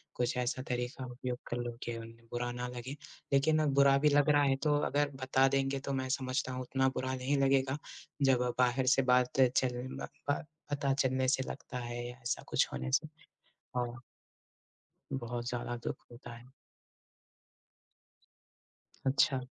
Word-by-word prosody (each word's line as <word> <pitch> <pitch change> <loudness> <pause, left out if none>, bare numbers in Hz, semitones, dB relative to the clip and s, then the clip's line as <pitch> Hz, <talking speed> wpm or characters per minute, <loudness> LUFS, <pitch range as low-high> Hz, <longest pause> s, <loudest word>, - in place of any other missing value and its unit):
कुछ 125 +1 0
ऐसा 125 +1 -1
तरीक़ा 125 +2 -2
उपयोग 125 0 -4
कर 120 - -2
लो 120 -1 -4
कि 115 -1 -3
उन्हें 115 0 -11
बुरा 120 0 -2
ना 125 0 -4
लगे, 125 +3 -5 0.4
लेकिन 155 +3 +4
अब 145 -2 +1
बुरा 140 0 +6
भी 150 +2 +4
लग 145 +1 +4
रहा 145 -1 +5
है, 135 -1 +3
तो 150 -1 +3
अगर 145 0 +1
बता 130 +1 +4
देंगे 135 0 +1
तो 140 - -1
मैं 130 -1 -2
समझता 130 -1 -1
हूँ, 130 0 -3
उतना 130 +1 +1
बुरा 130 0 -1
नहीं 130 +3 0
लगेगा, 135 0 +3 0.5
जब 125 -2 +3
बाहर 125 +1 +3
से - - +5
बात 125 +1 +3
चल 125 0 +2
ब - - -4 0.2
ब - - -1 0.3
पता 140 -1 +1
चलने 130 -1 +1
से 130 0 +2
लगता 135 - -6
है 120 -1 -4
या 120 - -7
ऐसा 120 - -2
कुछ - - +2
होने 65 0 -3
से - - +2 0.7
हाँ। 120 -1 -2 1.1
बहुत 120 -2 -3
ज़्यादा 120 0 -3
दुःख - - -2
होता 120 0 -10
है। 125 +2 -16 2.5
अच्छा। 135 0 +3
130 Hz, 165 wpm, -33 LUFS, 120-135 Hz, 2.5 s, बुरा